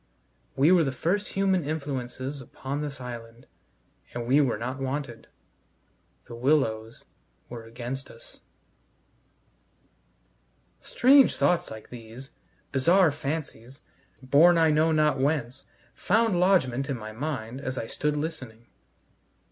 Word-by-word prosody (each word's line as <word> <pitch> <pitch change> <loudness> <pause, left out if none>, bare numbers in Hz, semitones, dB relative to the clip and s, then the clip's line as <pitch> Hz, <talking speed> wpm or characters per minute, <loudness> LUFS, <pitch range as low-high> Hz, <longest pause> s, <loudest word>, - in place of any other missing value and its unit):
We 145 +6 +4
were 180 -3 +5
the 135 - -1
first 185 +10 -2
human 190 -3 +2
influences 140 -2 -4
upon 135 +3 -6
this 145 -3 -5
island, 120 -1 -9 0.7
and 120 -1 -3
we 135 +5 +4
were 130 -6 0
not 130 +4 -5
wanted. 135 -3 -4 1.0
The 120 - -11
willows 115 -3 0 0.4
were 115 -2 -8
against 125 +3 -7
us. 115 - -14 2.4
Strange 270 +2 +5
thoughts 180 - +1
like 110 0 -10
these, 120 +3 -11 0.4
bizarre 170 +5 +4
fancies, 140 -3 -6 0.4
borne 155 +7 +5
I 160 -1 +4
know 155 +2 +3
not 150 -3 +2
whence, 135 -2 -1 0.3
found 225 -4 +1
lodgment 140 -8 +2
in 135 - -2
my 110 -1 -8
mind 130 -1 -5
as 130 -2 -4
I 115 - -3
stood 150 +5 -2
listening. 130 -8 -6
135 Hz, 120 wpm, -26 LUFS, 120-155 Hz, 2.4 s, were